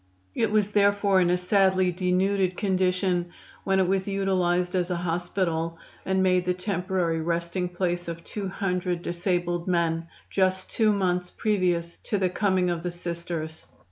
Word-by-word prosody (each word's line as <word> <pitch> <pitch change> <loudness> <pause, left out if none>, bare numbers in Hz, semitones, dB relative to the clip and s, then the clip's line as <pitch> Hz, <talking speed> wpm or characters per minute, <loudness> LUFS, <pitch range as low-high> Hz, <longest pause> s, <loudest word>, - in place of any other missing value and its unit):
It 225 - +1
was 210 -1 +1
therefore 200 -1 +3
in 175 - +3
a 180 - +3
sadly 185 0 +3
denuded 185 +1 +1
condition 185 -2 +1 0.4
when 195 -1 +2
it 185 - +3
was 190 +1 0
utilized 180 -3 +1
as 180 -1 0
a 180 - 0
hospital 170 -1 -1 0.3
and 190 0 +2
made 180 -1 +3
the 180 0 +1
temporary 180 -3 -1
resting 170 +2 -1
place 175 -1 -2
of 170 0 -6
two 205 -2 -5
hundred 180 -2 -2
disabled 175 0 -1
men, 165 -2 0 0.2
just 185 -1 0
two 220 -2 +3
months 180 -3 0
previous 180 -5 0
to 205 - 0
the 185 -2 +1
coming 185 -2 +1
of 170 -1 -2
the 175 - -2
Sisters. 170 -2 -5
180 Hz, 155 wpm, -26 LUFS, 175-190 Hz, 0.4 s, therefore